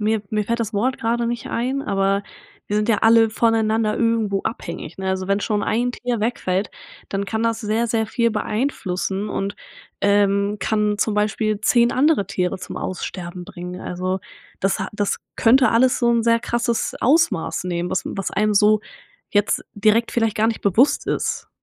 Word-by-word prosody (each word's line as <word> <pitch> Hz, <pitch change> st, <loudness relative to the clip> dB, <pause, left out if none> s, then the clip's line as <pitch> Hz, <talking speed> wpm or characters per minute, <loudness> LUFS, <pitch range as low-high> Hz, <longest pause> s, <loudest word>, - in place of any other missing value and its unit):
mir 215 Hz, 0 st, +1 dB
mir 210 Hz, -1 st, 0 dB
fällt 235 Hz, +2 st, -1 dB
das 220 Hz, 0 st, -2 dB
Wort 255 Hz, +6 st, +1 dB
gerade 235 Hz, +1 st, 0 dB
nicht 235 Hz, 0 st, -3 dB
ein, 260 Hz, +4 st, -1 dB
aber 195 Hz, -1 st, +1 dB, 0.5 s
wir 205 Hz, -, 0 dB
sind 210 Hz, +1 st, 0 dB
ja 220 Hz, -3 st, +3 dB
alle 225 Hz, 0 st, +5 dB
voneinander 220 Hz, -1 st, +1 dB
irgendwo 225 Hz, -4 st, +1 dB
abhängig, 170 Hz, -6 st, -5 dB
ne? 190 Hz, 0 st, -3 dB
Also, 190 Hz, 0 st, -1 dB
wenn 200 Hz, +1 st, +1 dB
schon 210 Hz, -1 st, -1 dB
ein 240 Hz, +3 st, 0 dB
Tier 245 Hz, -2 st, -3 dB
wegfällt, 205 Hz, -4 st, -1 dB, 0.4 s
dann 195 Hz, 0 st, -2 dB
kann 220 Hz, +2 st, -2 dB
das 230 Hz, -1 st, 0 dB
sehr, 220 Hz, +2 st, 0 dB
sehr 220 Hz, -1 st, 0 dB
viel 235 Hz, 0 st, +1 dB
beeinflussen 210 Hz, -3 st, -2 dB
und, 200 Hz, 0 st, -3 dB, 0.4 s
ähm, 200 Hz, 0 st, +2 dB
kann 210 Hz, -1 st, 0 dB
zum 215 Hz, -, +1 dB
Beispiel 215 Hz, 0 st, 0 dB
10 235 Hz, 0 st, +4 dB
andere 285 Hz, -, +2 dB
Tiere 185 Hz, -1 st, -1 dB
zum -, -, -8 dB
Aussterben 180 Hz, -1 st, -5 dB
bringen. 180 Hz, -1 st, -8 dB
Also, 185 Hz, +1 st, -3 dB, 0.4 s
das 195 Hz, +1 st, +1 dB
das 205 Hz, -1 st, -1 dB, 0.2 s
könnte 250 Hz, +1 st, +4 dB
alles 250 Hz, +2 st, +3 dB
so 240 Hz, -1 st, +3 dB
'n 230 Hz, -1 st, +2 dB
sehr 230 Hz, 0 st, +3 dB
krasses 235 Hz, -1 st, -1 dB
Ausmaß 290 Hz, -, +2 dB
nehmen, 175 Hz, -1 st, -2 dB
was -, -, 0 dB
was 195 Hz, -1 st, -3 dB
einem 210 Hz, 0 st, +1 dB
so 210 Hz, +1 st, +5 dB, 0.5 s
jetzt 205 Hz, 0 st, +1 dB
direkt 215 Hz, +3 st, +2 dB
vielleicht 225 Hz, -2 st, +1 dB
gar 220 Hz, +1 st, +3 dB
nicht 225 Hz, -, -1 dB
bewusst 215 Hz, +8 st, +3 dB
ist. -, -, -2 dB
215 Hz, 175 wpm, -21 LUFS, 200-230 Hz, 0.5 s, alle